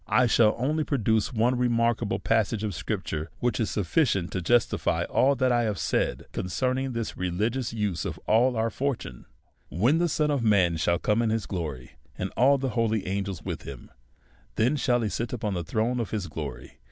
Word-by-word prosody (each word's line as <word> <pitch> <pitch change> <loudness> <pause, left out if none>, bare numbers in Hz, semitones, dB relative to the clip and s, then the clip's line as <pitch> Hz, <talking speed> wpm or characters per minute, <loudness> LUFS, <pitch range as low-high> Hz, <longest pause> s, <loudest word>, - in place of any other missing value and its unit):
I 125 - +4
shall 115 -2 +4
only 150 +6 0
produce 110 -6 +1
one 120 +1 +2
remarkable 115 -2 +1
passage 110 -1 0
of 105 -2 -2
scrip 80 - -3
ture, 80 +1 -4
which 120 0 -1
is 110 - 0
sufficient 100 - +1
to 95 - -2
justify 120 +5 +1
all 140 +2 +2
that 130 -1 +2
1 120 -1 +2
have. 105 -2 -2
said - - -1
concerning 130 +7 -1
this 115 -1 -3
religious 110 +8 -1
use 105 -6 -2
of - - -5
our 115 0 +3
fortune. 130 - -4 0.2
" - - -42
When 120 - +2
the 175 0 +2
Son 150 0 +1
of 140 -3 0
man 95 -6 +3
shall 85 +2 +1
come 105 +5 +1
in 115 - +1
his 110 -2 -1
glory, 75 -9 -5 0.3
and 95 - -3
all 135 +4 +5
tiie 135 -1 -2
holy 110 -3 0
angels 95 -2 -3
with - - -4
him, 70 -3 -10 0.6
then 120 +7 +2
shall 120 -3 +1
he 110 - 0
sit 115 +4 -3
upon 105 -4 -2
the 90 -2 -2
throne 115 +8 -1
of 115 - -2
his 105 -4 -3
glory. 75 -5 -7
110 Hz, 195 wpm, -27 LUFS, 95-125 Hz, 0.6 s, all